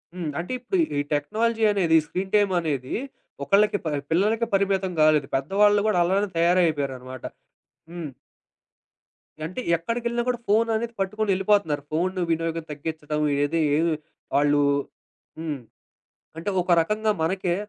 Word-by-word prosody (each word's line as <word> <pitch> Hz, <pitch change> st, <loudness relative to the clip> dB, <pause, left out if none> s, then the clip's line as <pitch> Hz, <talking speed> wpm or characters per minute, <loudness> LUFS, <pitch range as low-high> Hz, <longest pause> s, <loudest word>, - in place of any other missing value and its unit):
హ్మ్. 175 Hz, -4 st, -3 dB
అంటే, 175 Hz, -, -5 dB
ఇప్పుడు 255 Hz, +10 st, -2 dB, 0.2 s
ఈ -, -, +3 dB
టెక్నాలజీ 220 Hz, +9 st, 0 dB
అనేది 170 Hz, -5 st, +3 dB
స్క్రీన్ 190 Hz, +1 st, -4 dB
టైమనేది 170 Hz, -10 st, +1 dB, 0.5 s
ఒకళ్ళకి 205 Hz, +3 st, +3 dB
ప -, -, -1 dB, 0.2 s
పిల్లలకే 215 Hz, +7 st, +2 dB
పరిమితం 195 Hz, -1 st, +1 dB
గాలేదు. 155 Hz, -3 st, +4 dB
పెద్దవాళ్ళు 205 Hz, +9 st, +3 dB
గూడా 210 Hz, -4 st, +2 dB
అలానే 195 Hz, +3 st, +1 dB
తయారైపోయారనమాట. 145 Hz, -7 st, +1 dB, 0.7 s
హ్మ్. 170 Hz, -4 st, -6 dB, 1.4 s
అంటే 185 Hz, +10 st, -6 dB, 0.2 s
ఎక్కడికెళ్ళినా 235 Hz, +7 st, -2 dB
కూడా 245 Hz, -1 st, -1 dB
ఫోను 225 Hz, +3 st, +3 dB
అనేది 235 Hz, +1 st, -3 dB
పట్టుకొని 210 Hz, +2 st, -1 dB
ఎళ్ళిపోతున్నారు. 190 Hz, -7 st, +1 dB
ఫోను 180 Hz, +4 st, -1 dB
వినియోగం 165 Hz, 0 st, -1 dB
తగ్గించడం 150 Hz, 0 st, -4 dB, 0.2 s
ఏది 160 Hz, +3 st, +1 dB
ఏ -, -, +2 dB, 0.6 s
వాళ్ళు 145 Hz, 0 st, +3 dB, 0.8 s
హ్మ్. 155 Hz, -4 st, -4 dB, 0.8 s
అంటే 165 Hz, +5 st, -3 dB
ఒక 175 Hz, -, +1 dB
రకంగా 215 Hz, +6 st, 0 dB
మనకే 180 Hz, +1 st, 0 dB
180 Hz, 120 wpm, -24 LUFS, 155-205 Hz, 1.4 s, గాలేదు